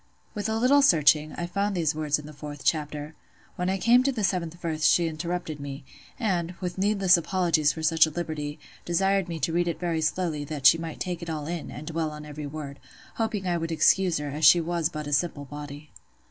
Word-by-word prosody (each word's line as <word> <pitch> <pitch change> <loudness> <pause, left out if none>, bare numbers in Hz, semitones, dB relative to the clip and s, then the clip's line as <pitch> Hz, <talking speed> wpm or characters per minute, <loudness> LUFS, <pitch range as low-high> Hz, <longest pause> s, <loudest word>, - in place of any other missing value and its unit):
'" - - -37
With 210 +1 -3
a 220 - 0
little 260 +5 +4
searching, 155 - +4
I 175 - -4
found 200 +3 -1
these 160 -3 +1
words 150 -1 0
in 150 - -10
the 150 - -10
fourth 145 -1 -8
chapter. 150 -1 -1 0.4
When 180 +1 -1
I 190 - 0
came 240 +5 +5
to 275 +2 +1
the 225 -5 -3
seventh 175 -3 -1
verse 160 -3 -3
she 170 +1 +4
interrupted 165 -1 -4
me, 140 0 -7 0.4
and, 180 -6 -1
with 180 0 -4
needless 195 -2 +4
apologies 170 -4 +1
for 160 - -7
such 160 +1 +5
a - - -3
liberty, 155 -2 -4 0.3
desired 195 +1 +1
me 165 - -4
to 165 - 0
read 175 +1 +1
it 170 - -2
very 170 -2 -1
slowly, 155 -2 -1
that 145 -2 -6
she 165 - +8
might 165 -1 -6
take 180 -2 -3
it 170 - -6
all 155 -2 -4
in, 170 0 -5
and 150 - -8
dwell 160 0 -2
on 150 0 -9
every 150 0 -7
word; 145 -1 -7 0.4
hoping 220 -4 -2
I 175 -1 +1
would 165 0 -3
excuse 175 +2 +3
her, 145 0 -4
as 150 +3 -5
she 160 +4 +8
was 170 -1 -1
but 155 -3 -6
a 145 - -4
"simple 145 -1 0
body." 145 +1 -9
165 Hz, 230 wpm, -26 LUFS, 150-180 Hz, 0.4 s, she